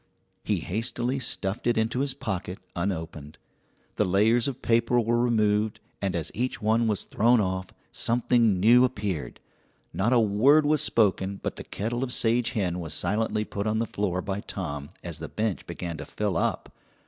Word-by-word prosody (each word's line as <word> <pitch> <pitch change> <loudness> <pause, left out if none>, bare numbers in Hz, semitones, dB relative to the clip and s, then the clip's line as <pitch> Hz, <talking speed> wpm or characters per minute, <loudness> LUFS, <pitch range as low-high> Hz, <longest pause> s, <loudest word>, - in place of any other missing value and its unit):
He - - 0
hastily 120 +5 -2
stuffed 105 -3 -3
it 120 - +2
into 115 +3 0
his 135 -1 0
pocket 95 -7 -4 0.2
unopened. 80 -5 -4 0.6
The - - +3
layers 110 +6 +3
of 135 -3 -5
paper 115 +1 +3
were 120 +1 +1
removed, 110 -3 +1 0.2
and 95 -3 -1
as 85 -1 -3
each 125 +1 -2
one 110 +1 +2
was 105 -3 0
thrown 120 +3 +3
off, 95 -2 -1 0.2
something 115 -4 +2
new 120 +6 +6
appeared. 100 - -2 0.5
Not 110 +6 +1
a 125 - +5
word 120 +9 +4
was 150 -1 +3
spoken, 100 -7 +2
but - - -2
the - - -7
kettle 120 +5 -3
of 130 - -3
sage 120 0 +2
hen 90 -4 -1
was 80 -3 -5
silently 105 +3 0
put 100 +1 -4
on 110 0 +1
the 115 - +1
floor 95 -4 -2
by 100 0 -3
Tom 75 -8 -5
as 85 -3 -6
the 80 - -6
bench 110 -3 -2
began 85 -1 -5
to 75 - -7
fill 105 -4 -2
up. - - -1
105 Hz, 175 wpm, -26 LUFS, 95-120 Hz, 0.6 s, new